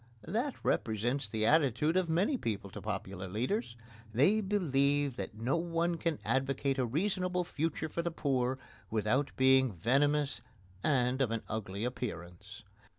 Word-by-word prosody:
That 240 - -1
represents 120 +3 0
the 110 +1 -1
attitude 150 +2 +3
of 185 -2 +2
many 185 - +2
people 105 - -3
to - - -8
popular 95 -2 -4
leaders. 120 - -2 0.4
They 150 - +4
believe 145 - +1
that 100 +2 -5
no 120 +7 0
one 170 0 0
can 165 -2 -1
advocate 135 +1 0
a 125 - +1
reasonable 180 - 0
future 160 -1 -2
for 170 - -2
the 170 - -1
poor 130 -5 0 0.3
without 115 +6 +1
being 130 -1 +5
venomous 140 - +1 0.4
and 130 -2 +2
of 130 - +2
an 115 -1 -2
ugly 105 -2 -4
appearance. 100 -3 -5
135 Hz, 145 wpm, -32 LUFS, 110-165 Hz, 0.4 s, being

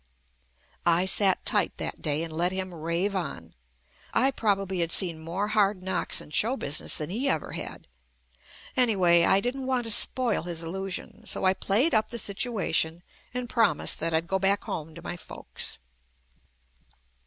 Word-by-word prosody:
I 175 +1 +4
sat 190 0 +3
tight - - +2
that - - -4
day 150 +1 0
and 165 -1 -5
let 175 +3 +2
him 190 -1 -3
rave 170 +5 -1
on. 85 - -4 0.6
I 265 +4 +4
probably 195 -6 0
had 170 -1 +1
seen 170 -4 0
more 175 +6 -3
hard 205 -3 +2
knocks 190 - 0
in - - -11
show 235 - +2
business 145 - +1
than 155 +2 -3
he 255 +7 0
ever 155 - -1
had. - - -7 0.9
Anyway, 185 -9 +5
I 195 - +5
didn't 255 +4 -3
want 255 -2 +1
to 225 - -1
spoil 235 0 +1
his 170 -1 -3
illusion 190 +5 -6
so - - 0
I 185 - +5
played 225 - +1
up 215 -1 +2
the 235 - -4
situation 195 -7 -1 0.3
and 250 0 -4
promised 225 -11 +2
that 165 +1 0
I'd 160 +1 +1
go 190 +3 0
back 195 +1 +2
home 155 0 -5
to 170 - -10
my 175 - -5
folks. - - -3
190 Hz, 165 wpm, -27 LUFS, 170-220 Hz, 0.9 s, Anyway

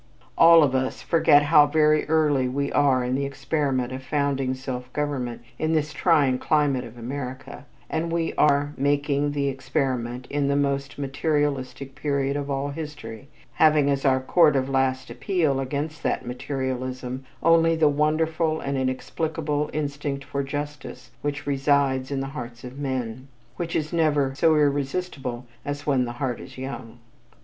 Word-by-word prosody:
All 165 -1 +8
of 135 -3 +1
us 130 0 -1
forget 155 -3 +5
how 145 0 +6
very 150 0 +3
early 150 -5 +3
we 140 +2 -2
are 135 -3 +3
in 125 +1 -1
the 135 +2 0
experiment 135 -3 -1
of 130 - -5
founding 135 -2 -1
self 125 -1 -6
government 130 -5 -3 0.2
in 155 +1 0
this 155 -1 0
trying 145 -7 +3
climate 145 -5 +1
of 115 0 -11
America, 130 +3 -7 0.2
and 160 - -1
that 165 - -1
we 165 -1 -1
are 145 0 +2
making 145 +1 +1
the 140 -1 0
experiment 130 -2 -2
in 145 -1 0
the 140 - +1
most 140 -1 -1
materialistic 140 -2 -2
period 140 -1 -1
of 145 0 -3
all 140 +1 -1
history, 140 -6 -7 0.3
having 150 -2 +4
as 140 -1 -1
our 130 -2 +3
court 150 +3 +4
of 135 0 0
last 130 -2 0
appeal 145 +2 0
against 145 +4 -3
that - - -1
materialism 130 0 -4 0.2
only 165 0 +5
the 160 -1 +4
wonderful 155 +2 +1
and 140 -1 -2
inexplicable 150 +3 -2
instinct 145 -2 -3
for 140 +1 -3
justice 140 -4 -6
which 145 0 -3
resides 135 -2 +1
in 140 -1 -2
the 135 - -4
hearts 120 -4 -7
of 130 +2 -9
men, 130 -2 -3 0.3
which 170 -1 -3
is 155 0 -1
never 150 -5 +2
so 160 +3 +3
irresistible 140 -3 -1 0.2
as 145 0 -5
when 135 -4 +2
the 120 - -5
heart 125 -1 -3
is 130 - -11
young. 125 -3 -7
140 Hz, 160 wpm, -24 LUFS, 130-150 Hz, 0.3 s, All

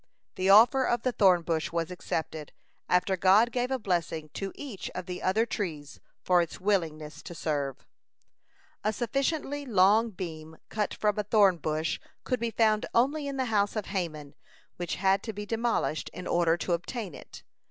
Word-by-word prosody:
The 185 +1 0
offer 235 +7 +7
of 240 -2 0
the 255 - +1
thorn 185 -7 +4
bush 165 +1 -1
was 165 0 -2
accepted, 160 -3 -4 0.4
after 180 +2 +2
God 195 +6 +5
gave 245 0 -1
a 265 - 0
blessing 170 -7 -2
to 195 -1 -4
each 255 -10 -7
of 185 - -4
the 180 0 -6
other 215 +5 +2
trees 160 -10 -5 0.2
for 180 -1 +4
its 170 - -5
willingness 165 -6 -1
to 175 - -9
serve. 145 -5 -3 1.0
A 215 - +1
sufficiently 275 +4 -1
long 215 -1 +4
beam 160 -5 -7
cut 210 -1 -2
from 210 -1 0
a - - +1
thorn 200 -3 +4
bush 155 +1 -2 0.2
could 255 -1 -1
be 235 - -1
found 220 -2 +2
only 280 +5 +2
in 275 -1 -4
the 260 - 0
house 205 0 +2
of 215 - -2
Haman, 155 -6 -3 0.4
which 175 -1 -3
had 195 +1 +2
to 220 - -5
be 205 +1 -6
demolished 225 -7 -1
in 180 - -7
order 170 -1 +2
to 175 - -1
obtain 185 - -4
it. - - -12
195 Hz, 175 wpm, -28 LUFS, 170-225 Hz, 1.0 s, offer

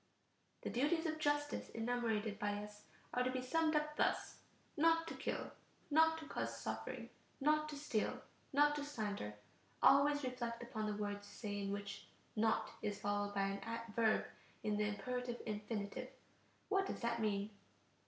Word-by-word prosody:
The - - -2
duties 310 +7 +2
of 315 -1 -1
justice 290 -1 +1
enumerated 225 -3 0
by 205 -1 +1
us 210 0 -11 0.3
are 250 - +2
to 250 - +2
be 255 0 -1
summed 320 +4 +2
up 300 0 +1
thus: - - +1 0.4
Not 330 +1 +4
to - - -3
kill... - - -3 0.4
not 320 +2 +6
to 320 - -7
cause - - -2
suffering... - - -4 0.3
not 305 +2 +3
to 300 - -4
steal... 240 -7 0 0.3
not 295 +1 +5
to 290 - -2
slander. 210 - -3 0.5
Always 290 +1 +6
reflect 240 -2 -2
upon 220 -3 -2
the 210 -1 -1
words 205 -1 -3
you - - -13
say 205 -2 -3
in 200 0 -1
which 200 0 -4 0.3
"Not" 220 0 +2
is 205 -1 -2
followed 205 0 0
by 195 0 +1
a 230 0 -4
verb 220 0 +3 0.4
in 210 -1 +1
the 210 0 +2
imperative 245 +3 -2
infinitive. 210 +3 -3 0.6
What 390 -1 +2
does - - -4
that 235 -1 0
mean? 205 -1 0
235 Hz, 165 wpm, -39 LUFS, 210-290 Hz, 0.6 s, not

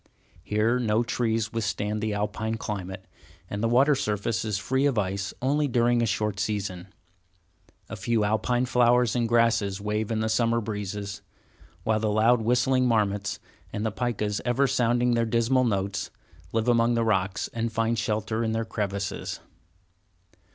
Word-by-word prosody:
Here, 110 +6 +1
no 110 -1 +1
trees 115 -2 -1
withstand 105 -1 -2
the 110 -1 -1
Alpine 105 +2 -2
climate, 95 -3 -5 0.4
and 100 +2 -4
the 115 - +2
water 135 +5 +5
surface 105 -4 -1
is 105 -2 -1
free 130 +7 +1
of 135 -5 0
ice 95 -1 -1
only 145 +3 +2
during 120 -1 +2
a 115 - +1
short 105 -1 -1
season. 100 -3 -3 1.0
A - - -6
few 115 -2 0
Alpine 110 +4 +1
flowers 125 -1 +3
and 120 -2 +1
grasses 115 -4 +2
wave 105 +1 -2
in 110 -1 -1
the 110 - 0
summer 115 +1 +2
breezes, 105 -2 -5 0.6
while 110 +2 +1
the 110 0 0
loud 110 +3 +3
whistling 125 +2 +2
marmots, 105 -4 0 0.3
and 105 - -3
the 110 - 0
picas 105 -3 -2
ever 120 +3 +2
sounding 120 -1 +2
their 115 0 +2
dismal 115 +3 +2
notes, 100 -3 -1 0.4
live 115 +1 0
among 120 0 +3
the 115 -1 +1
rocks, 95 -3 0
and 115 0 -2
find 115 +1 0
shelter 110 +1 -1
in 110 -1 -1
their 115 0 -1
crevices. 100 -3 -3
110 Hz, 160 wpm, -26 LUFS, 105-120 Hz, 1.0 s, water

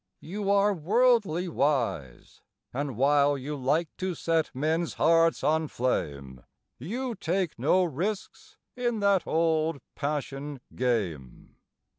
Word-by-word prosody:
You 200 +4 -4
are 200 +1 +4
worldly 200 -1 +2
wise, 130 - -2 0.3
And 135 -2 -3
while 140 +2 +3
you 140 +3 -5
like 145 +5 0
to 185 -1 -2
set 165 0 0
men's 160 +5 -1
hearts 165 0 +3
on 160 +1 +2
flame, 70 - -3 0.4
You 240 - -3
take 185 - -2
no 180 +9 +3
risks 180 +6 -4 0.2
in 240 -3 -1
that 200 -3 +2
old 160 -2 +1
passion 145 -1 -4
game. 95 - -2
155 Hz, 115 wpm, -27 LUFS, 135-185 Hz, 0.4 s, are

